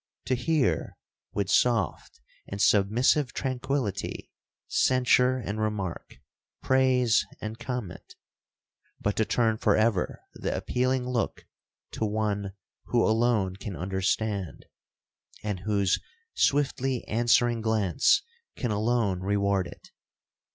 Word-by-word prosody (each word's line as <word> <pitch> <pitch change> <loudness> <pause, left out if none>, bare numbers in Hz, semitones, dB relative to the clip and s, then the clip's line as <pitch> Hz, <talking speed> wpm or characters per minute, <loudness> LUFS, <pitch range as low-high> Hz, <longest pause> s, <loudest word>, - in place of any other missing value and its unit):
—To 130 - 0
hear, 150 +2 0 0.3
with 100 -2 -1
soft 115 - +1 0.3
and 100 - -6
submissive 110 +7 +3
tranquillity, 130 -5 -3 0.4
censure 130 0 +3
and 110 -3 -4
remark, 105 -5 -3 0.5
praise 130 -3 +3 0.2
and 110 +1 -6
comment, 125 -8 -6 0.8
but 105 - -1
to 110 - +2
turn 110 -1 +1
for - - +3
ever 110 -4 0
the - - -3
appealing 125 0 0
look 125 -2 -2 0.5
to - - -4
one 105 -2 -2 0.3
who 120 -1 +2
alone 110 -4 +1
can 95 -1 -6
understand, 95 - -2 0.8
and 105 -3 -2
whose 100 0 +1 0.3
swiftly 135 - +1
answering 120 +1 +2
glance 110 - +2 0.3
can 120 -4 -2
alone 105 -3 +1
reward 100 -1 0
it! - - -14
110 Hz, 105 wpm, -27 LUFS, 100-125 Hz, 0.8 s, submissive